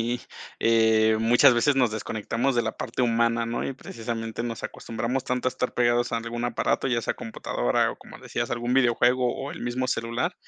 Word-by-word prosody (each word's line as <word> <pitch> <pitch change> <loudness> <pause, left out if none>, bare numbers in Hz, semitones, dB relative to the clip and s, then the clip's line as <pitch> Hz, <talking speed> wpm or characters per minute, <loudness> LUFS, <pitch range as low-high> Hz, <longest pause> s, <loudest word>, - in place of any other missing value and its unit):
sí, 120 +2 -1 0.4
eh, 110 -1 +4
muchas 120 +3 +6
veces 135 +4 +2
nos 125 -4 +3
desconectamos 115 +4 -2
de 120 - +3
la 110 - -2
parte - - -2
humana, 115 0 +2
¿no? 115 +1 -3
Y, 135 - -4
precisamente, 115 -2 -5
nos 115 -2 -5
acostumbramos 120 +3 -3
tanto 125 0 -2
a - - +3
estar 125 - -3
pegados 120 0 +2
a - - +1
algún 115 +1 -4
aparato, 120 - 0
ya 120 -2 0
sea - - -1
computadora - - -1
o, - - -14
como - - -13
decías, - - -4
algún 120 +1 -1
videojuego 125 0 +3
o 135 +1 -5
el 165 - -8
mismo 125 +1 -2
celular, 115 +10 -1
120 Hz, 195 wpm, -26 LUFS, 115-125 Hz, 0.4 s, muchas